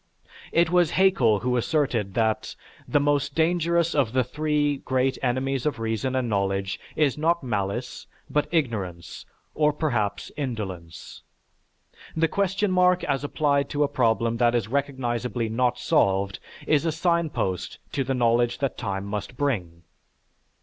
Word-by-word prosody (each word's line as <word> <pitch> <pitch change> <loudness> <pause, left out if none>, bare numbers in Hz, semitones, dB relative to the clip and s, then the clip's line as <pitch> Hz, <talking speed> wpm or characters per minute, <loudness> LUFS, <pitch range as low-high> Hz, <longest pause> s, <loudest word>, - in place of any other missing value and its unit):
It 170 0 +3
was 175 -3 +4
Haeckel 135 - +3
who 125 0 0
asserted 120 - 0
that, 110 -2 0 0.3
"The 145 - +3
most 145 -1 +1
dangerous 170 0 +2
of 130 -6 +1
the 130 0 +3
three 145 +2 0
great 130 0 0
enemies 130 +1 0
of 145 - -1
reason 115 +3 -2
and 130 -2 0
knowledge 100 -2 -1 0.2
is 150 -2 +1
not 170 +1 +1
malice, 110 +1 -3 0.2
but 150 - 0
ignorance, 105 - -3 0.3
or 150 -1 +3
perhaps, 120 -10 -2
indolence." 95 - -6 0.9
The 165 0 +3
question 195 +2 0
mark 180 0 +3
as 140 -1 -1
applied 145 -1 +1
to 145 0 +1
a - - +2
problem 115 -4 +1
that 120 0 +3
is 115 -4 0
recognizably 125 -3 -2
not 125 +2 +1
solved 100 -4 +1 0.3
is 150 -1 +3
a 165 - +1
signpost 160 - -1
to 135 - -1
the 135 0 -1
knowledge 120 0 +2
that 135 -2 -2
time 95 0 -3
must 105 +4 -5
bring. 90 -12 -2
130 Hz, 145 wpm, -25 LUFS, 110-150 Hz, 0.9 s, was